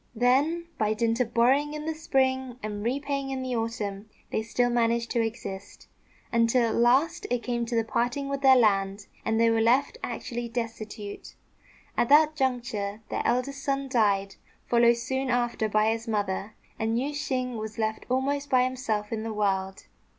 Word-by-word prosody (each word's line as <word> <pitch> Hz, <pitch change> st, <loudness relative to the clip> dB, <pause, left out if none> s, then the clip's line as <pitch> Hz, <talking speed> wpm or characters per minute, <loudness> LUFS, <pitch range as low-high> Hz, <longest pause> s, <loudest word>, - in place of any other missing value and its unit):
Then, 275 Hz, +9 st, +2 dB
by 215 Hz, -1 st, +1 dB
dint 230 Hz, +1 st, 0 dB
of 240 Hz, -2 st, 0 dB
borrowing 275 Hz, +6 st, +3 dB
in 300 Hz, 0 st, -5 dB
the 320 Hz, -, -1 dB
spring 260 Hz, -4 st, 0 dB
and 205 Hz, -1 st, -4 dB
repaying 275 Hz, +3 st, -2 dB
in 265 Hz, -1 st, -3 dB
the 255 Hz, -1 st, -2 dB
autumn, 215 Hz, -3 st, -3 dB, 0.2 s
they -, -, 0 dB
still 245 Hz, +2 st, 0 dB
managed 235 Hz, 0 st, +1 dB
to 235 Hz, -, +2 dB
exist, 210 Hz, -4 st, -6 dB, 0.5 s
until 230 Hz, +1 st, +3 dB
at -, -, -1 dB
last 275 Hz, +9 st, +2 dB
it 245 Hz, -1 st, -1 dB
came 235 Hz, -1 st, -2 dB
to 230 Hz, -1 st, +1 dB
parting 245 Hz, +5 st, -1 dB
with 275 Hz, 0 st, -3 dB
their 265 Hz, -1 st, +7 dB
land, 200 Hz, -3 st, +2 dB, 0.2 s
and 225 Hz, 0 st, 0 dB
they 230 Hz, 0 st, +4 dB
were 225 Hz, 0 st, +2 dB
left 265 Hz, -, +2 dB
actually 240 Hz, -1 st, -4 dB
destitute. 225 Hz, -3 st, -6 dB, 0.6 s
At 240 Hz, -, +1 dB
that 305 Hz, +1 st, +6 dB
juncture 235 Hz, -7 st, -2 dB
their -, -, -1 dB
eldest 275 Hz, +3 st, -1 dB
son 275 Hz, -1 st, -1 dB
died, 200 Hz, -5 st, +1 dB, 0.3 s
followed 235 Hz, 0 st, +4 dB
soon 265 Hz, +2 st, -2 dB
after 240 Hz, -3 st, 0 dB
by 215 Hz, +1 st, +3 dB
his 225 Hz, +1 st, -4 dB
mother; 205 Hz, -1 st, -2 dB, 0.2 s
and 225 Hz, +1 st, 0 dB
Yüeh 270 Hz, +4 st, -1 dB
shêng 255 Hz, -4 st, -2 dB
was 220 Hz, 0 st, -6 dB
left 220 Hz, -1 st, -2 dB
almost 280 Hz, +3 st, 0 dB
by 255 Hz, -1 st, +4 dB
himself 235 Hz, -5 st, -2 dB
in 220 Hz, -, -2 dB
the 225 Hz, 0 st, -4 dB
world. 195 Hz, -2 st, -1 dB
235 Hz, 170 wpm, -27 LUFS, 220-265 Hz, 0.6 s, their